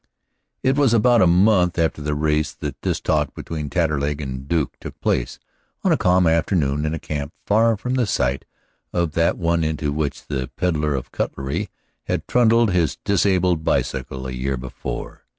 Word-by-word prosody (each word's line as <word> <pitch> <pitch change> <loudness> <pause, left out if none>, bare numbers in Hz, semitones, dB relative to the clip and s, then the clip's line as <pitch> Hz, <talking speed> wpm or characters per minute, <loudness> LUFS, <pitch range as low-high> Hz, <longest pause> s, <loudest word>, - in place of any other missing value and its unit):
It 135 0 +3
was 130 -5 +4
about 120 +1 +4
a 90 - +6
month 90 0 +4
after 80 -2 0
the 75 0 -1
race 75 +1 0
that - - -6
this - - -1
talk - - 0
between 75 -3 -5
Taterleg 75 -5 0
and 70 -3 -4
the 65 - -5
Duke 80 -1 0
took - - -9
place, - - -1 0.5
on - - +3
a - - +5
calm 90 0 +3
afternoon 80 -3 +1
in 80 - -1
a - - -5
camp 75 0 -5
far 110 +2 +3
from 125 +5 -3
the 125 -4 +1
site 65 -6 0 0.5
of 85 -3 0
that 85 +2 +1
one 85 -1 +1
into 75 -2 -1
which 75 -2 -3
the 65 -3 -3
peddler 75 -5 0
of 65 - -5
cutlery 70 0 -3 0.4
had - - -2
trundled 115 -2 +4
his 85 -3 +1
disabled 90 -4 +2
bicycle 65 -2 -1
a 65 - -4
year 65 +1 -2
before. 60 0 -6
80 Hz, 180 wpm, -22 LUFS, 70-95 Hz, 0.5 s, a